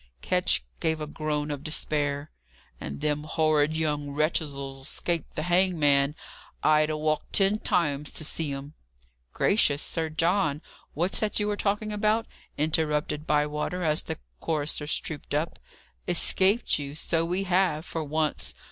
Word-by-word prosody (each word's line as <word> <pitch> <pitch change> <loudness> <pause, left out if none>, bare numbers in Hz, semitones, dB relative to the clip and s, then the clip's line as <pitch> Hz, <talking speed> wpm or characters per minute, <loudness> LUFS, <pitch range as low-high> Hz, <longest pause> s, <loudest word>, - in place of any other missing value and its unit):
Ketch - - +2 0.2
gave 160 -1 +1
a 155 - -3
groan 150 -1 -2
of 145 -1 -4
despair. 145 -1 -1 0.5
"And 70 0 -6
them 150 0 0
horrid 155 0 +2
young 150 -2 0
wretches'll 140 -2 -1
escape 165 +4 -2
the 155 - -2
hangman! 155 -6 +3 0.5
I'd 155 0 +5
ha' 155 - -1
walked 155 0 -1
ten 200 +2 +3
miles 150 -4 +1
to - - -6
see 155 -1 -2
em 140 +2 -6 0.3
" 60 0 -39
"Gracious, 150 -9 +3
Sir 165 -1 -2
John, 160 -1 +1 0.3
what's 175 +5 0
that 215 -1 0
you 210 - +1
are - - 0
talking 210 +1 -1
about?" 215 +2 +2 0.3
interrupted 150 0 0
Bywater, 150 +4 0
as 155 -1 +2
the 160 - -5 0.2
choristers 150 -1 -1
trooped 150 -2 -5
up, 155 +3 -1 0.5
"Escaped 190 +5 +3
you! 140 0 -5
so 165 +1 +1
we 180 +3 0
have, 180 -4 +2
for 165 -2 -3
once. 155 +1 -1
155 Hz, 145 wpm, -27 LUFS, 145-170 Hz, 0.5 s, I'd